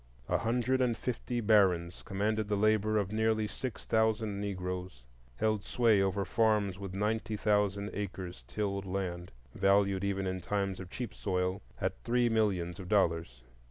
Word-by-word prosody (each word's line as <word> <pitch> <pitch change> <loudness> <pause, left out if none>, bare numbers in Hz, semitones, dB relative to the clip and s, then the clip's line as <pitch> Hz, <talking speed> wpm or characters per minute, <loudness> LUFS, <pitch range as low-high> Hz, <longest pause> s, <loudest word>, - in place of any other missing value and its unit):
A - - +1
hundred 125 +3 +1
and 120 -3 +1
fifty 120 0 -2
barons 95 -6 +3
commanded 105 +2 -1
the 105 - +1
labor 110 +1 +2
of 100 -1 0
nearly 110 0 +1
six 125 +2 -5
thousand 110 -2 +1
Negroes, 90 -8 -4 0.3
held 110 - 0
sway 115 -5 +3
over 95 0 0
farms 105 -2 +1
with 95 -1 -6
ninety 110 +2 -1
thousand 105 -1 +1
acres 95 -8 -5
tilled 100 -2 -2
land, 90 -2 -3 0.2
valued 100 0 +3
even 100 -1 -1
in 95 0 -2
times 100 +1 -1
of 95 -1 -8
cheap 120 +2 -5
soil 90 0 -1 0.2
at 60 - -2
three 120 0 +2
millions 100 -5 0
of 90 -1 -8
dollars. 80 - +1
100 Hz, 155 wpm, -32 LUFS, 95-110 Hz, 0.3 s, barons